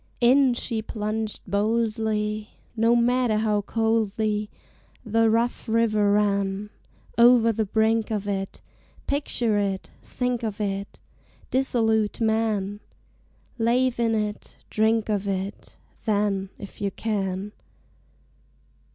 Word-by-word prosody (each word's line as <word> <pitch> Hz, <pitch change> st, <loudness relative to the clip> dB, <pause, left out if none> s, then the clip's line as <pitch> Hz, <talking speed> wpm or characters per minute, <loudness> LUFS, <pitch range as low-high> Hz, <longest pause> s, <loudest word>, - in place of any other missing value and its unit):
In 255 Hz, +1 st, +5 dB
she 230 Hz, -2 st, -2 dB
plunged 215 Hz, 0 st, -3 dB
boldly, 215 Hz, +1 st, 0 dB, 0.3 s
No 230 Hz, +1 st, +3 dB
matter 240 Hz, -1 st, +2 dB
how 215 Hz, -1 st, +1 dB
coldly 215 Hz, -1 st, 0 dB, 0.6 s
The 225 Hz, +1 st, +3 dB
rough 230 Hz, +1 st, 0 dB
river 215 Hz, -3 st, +3 dB
ran 200 Hz, 0 st, 0 dB, 0.5 s
Over 235 Hz, -1 st, +6 dB
the 220 Hz, -1 st, -1 dB
brink 220 Hz, +1 st, +2 dB
of 210 Hz, -2 st, -2 dB
it! 195 Hz, -1 st, -3 dB, 0.4 s
Picture 240 Hz, -6 st, 0 dB
it 195 Hz, -2 st, -2 dB
think 250 Hz, -1 st, -2 dB
of 220 Hz, -2 st, -4 dB
it, 200 Hz, -1 st, -3 dB, 0.5 s
Dissolute 225 Hz, -5 st, +1 dB
man! 220 Hz, -3 st, 0 dB, 0.8 s
Lave 240 Hz, +2 st, +2 dB
in 230 Hz, -1 st, +2 dB
it, 210 Hz, -1 st, -4 dB
drink 220 Hz, 0 st, +2 dB
of 205 Hz, -2 st, -1 dB
it, 195 Hz, +1 st, -4 dB, 0.3 s
Then, 200 Hz, -2 st, +1 dB
if 200 Hz, +1 st, -11 dB
you 200 Hz, -, +1 dB
can! 195 Hz, -2 st, -3 dB
220 Hz, 110 wpm, -25 LUFS, 205-230 Hz, 0.8 s, Over